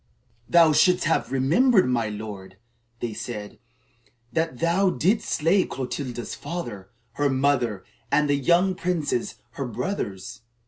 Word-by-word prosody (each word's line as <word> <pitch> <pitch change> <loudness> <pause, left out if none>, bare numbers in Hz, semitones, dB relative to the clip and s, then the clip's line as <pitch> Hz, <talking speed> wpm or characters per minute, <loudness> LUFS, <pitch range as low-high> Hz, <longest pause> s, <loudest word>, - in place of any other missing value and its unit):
"Thou 170 -2 +6
shouldst 180 +4 +4
have 155 -6 0
remembered, 185 - +3
my 120 -3 0
lord," 100 -3 -8 0.4
they 115 -2 -3
said, 105 -1 -7 0.7
"that 160 -5 -1
thou 175 +6 +2
didst 185 - +1
slay 170 +5 +3
Clotilda's 125 -2 -5
father, 115 - -6 0.2
her 145 +4 0
mother, 130 -8 0 0.3
and 150 0 +3
the 145 - +2
young 170 +7 +3
princes, 165 -8 -2 0.2
her 135 +2 -4
brothers. 115 - -4
140 Hz, 125 wpm, -24 LUFS, 115-170 Hz, 0.7 s, Thou